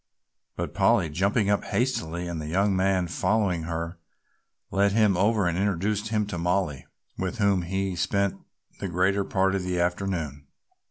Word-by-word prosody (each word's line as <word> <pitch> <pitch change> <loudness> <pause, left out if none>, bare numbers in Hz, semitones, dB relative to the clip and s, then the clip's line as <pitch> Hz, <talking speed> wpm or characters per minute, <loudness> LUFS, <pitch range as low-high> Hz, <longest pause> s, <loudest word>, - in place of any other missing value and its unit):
But - - -4
Polly, 80 -3 +3
jumping 100 +5 +1
up 100 - +1
hastily 90 -9 -1
and 85 -2 -4
the 75 - -6
young 95 +4 +2
man 95 -1 +2
following 90 -1 0
her, 85 +1 -4 0.7
led 100 +1 +2
him 105 -3 +4
over 105 +2 +2
and 85 -1 +1
introduced 100 +2 0
him 105 -1 0
to 100 -4 -5
Mollie, 90 -6 -1 0.3
with 95 +4 -2
whom 100 -3 +3
he 95 +2 -2
spent 100 +2 0 0.4
the 100 - -3
greater 95 +3 +1
part 95 0 +1
of 100 - 0
the 90 -1 -2
afternoon. 85 -5 -2
95 Hz, 160 wpm, -26 LUFS, 85-100 Hz, 0.7 s, him